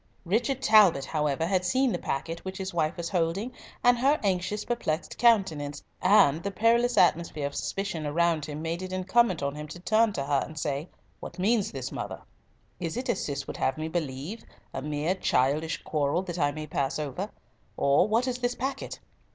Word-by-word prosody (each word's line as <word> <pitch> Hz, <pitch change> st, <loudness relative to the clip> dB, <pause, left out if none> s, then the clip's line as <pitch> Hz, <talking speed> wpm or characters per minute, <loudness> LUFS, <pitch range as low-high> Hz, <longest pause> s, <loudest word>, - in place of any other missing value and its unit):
Richard 245 Hz, +8 st, 0 dB
Talbot, 195 Hz, -, +6 dB
however, 150 Hz, 0 st, 0 dB
had 185 Hz, +1 st, +1 dB
seen 255 Hz, +8 st, +2 dB
the -, -, -2 dB
packet 165 Hz, +5 st, -3 dB
which 190 Hz, 0 st, -6 dB
his 190 Hz, -1 st, -4 dB
wife 165 Hz, 0 st, 0 dB
was 170 Hz, -1 st, -3 dB
holding, 185 Hz, +6 st, 0 dB, 0.3 s
and 245 Hz, 0 st, +5 dB
her 280 Hz, +4 st, +3 dB
anxious, 190 Hz, +1 st, -1 dB
perplexed 180 Hz, -9 st, -2 dB
countenance, 175 Hz, -12 st, +2 dB, 0.2 s
and 185 Hz, -6 st, +5 dB
the 200 Hz, -, -2 dB
perilous 235 Hz, +3 st, +2 dB
atmosphere 170 Hz, -5 st, +3 dB
of 140 Hz, -, -3 dB
suspicion 195 Hz, -5 st, -3 dB
around 165 Hz, 0 st, +1 dB
him 150 Hz, +1 st, -6 dB
made 165 Hz, +2 st, -2 dB
it 185 Hz, 0 st, -6 dB
incumbent 185 Hz, 0 st, +2 dB
on 140 Hz, 0 st, -1 dB
him 150 Hz, +1 st, -7 dB
to 175 Hz, -, -9 dB
turn 220 Hz, +4 st, +3 dB
to 140 Hz, -, -2 dB
her 140 Hz, -1 st, +2 dB
and 155 Hz, -, -10 dB
say, 145 Hz, +2 st, -2 dB, 0.3 s
"What 170 Hz, -, -9 dB
means 205 Hz, +2 st, +1 dB
this, 130 Hz, -2 st, -5 dB
mother? -, -, -6 dB, 0.6 s
Is 170 Hz, +3 st, -3 dB
it 255 Hz, -, -3 dB
as -, -, 0 dB
Cis 140 Hz, -1 st, -3 dB
would -, -, -7 dB
have 135 Hz, -, 0 dB
me 155 Hz, 0 st, -3 dB
believe, 160 Hz, -, -4 dB, 0.3 s
a -, -, -3 dB
mere 150 Hz, +4 st, -1 dB
childish 155 Hz, -2 st, 0 dB
quarrel 150 Hz, +3 st, 0 dB
that 175 Hz, -2 st, -5 dB
I 145 Hz, -1 st, +2 dB
may 155 Hz, +1 st, -6 dB
pass 140 Hz, -2 st, -1 dB
over? 155 Hz, +7 st, -4 dB, 0.5 s
or 140 Hz, +7 st, +4 dB
what 230 Hz, +4 st, +1 dB
is 250 Hz, -1 st, -2 dB
this 245 Hz, 0 st, -1 dB
packet?" 270 Hz, +2 st, -4 dB
170 Hz, 190 wpm, -28 LUFS, 150-210 Hz, 0.6 s, Talbot